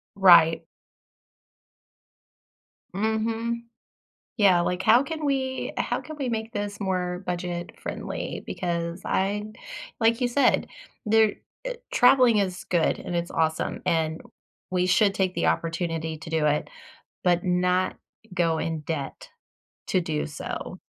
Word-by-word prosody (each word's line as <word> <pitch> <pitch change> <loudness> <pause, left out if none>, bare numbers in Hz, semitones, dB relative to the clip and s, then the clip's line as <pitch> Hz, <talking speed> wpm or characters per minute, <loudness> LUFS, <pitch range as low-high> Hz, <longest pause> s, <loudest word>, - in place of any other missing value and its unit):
Right. 170 -4 +7 2.3
Mhm. 225 +2 -1 0.7
Yeah, 195 -6 +5
like, 180 +1 -1
"How 240 +7 +6
can 315 0 -5
we 265 -2 -1
how - - -1
can 310 -1 -9
we 270 -4 -2
make 225 0 -3
this 205 0 -4
more 180 -1 -2
budget-friendly, 175 -1 -4
because 170 -1 -3
I 205 +2 -1 0.5
like 230 +2 +3
you 245 - +2
said, 280 +4 +2 0.4
there 220 -1 +4 0.3
eh, - - -3 0.2
traveling 245 -3 +6
is 185 -2 -1
good 170 -3 +1
and - - -6
it's 170 0 -2
awesome, 160 0 -1
and 160 -1 0 0.5
we 180 0 +1
should 195 +2 +3
take 185 -2 0
the - - 0
opportunity 165 -1 -1
to 155 +2 -9
do 160 -2 +1
it, 150 0 +1 0.6
but 175 0 +3
not 180 +1 +1 0.4
go 165 -3 +1
in 160 -1 -2
debt 145 -2 -5 0.6
to 185 - +2
do 155 -3 -2
so." 155 +4 -6
185 Hz, 125 wpm, -26 LUFS, 170-220 Hz, 2.3 s, Right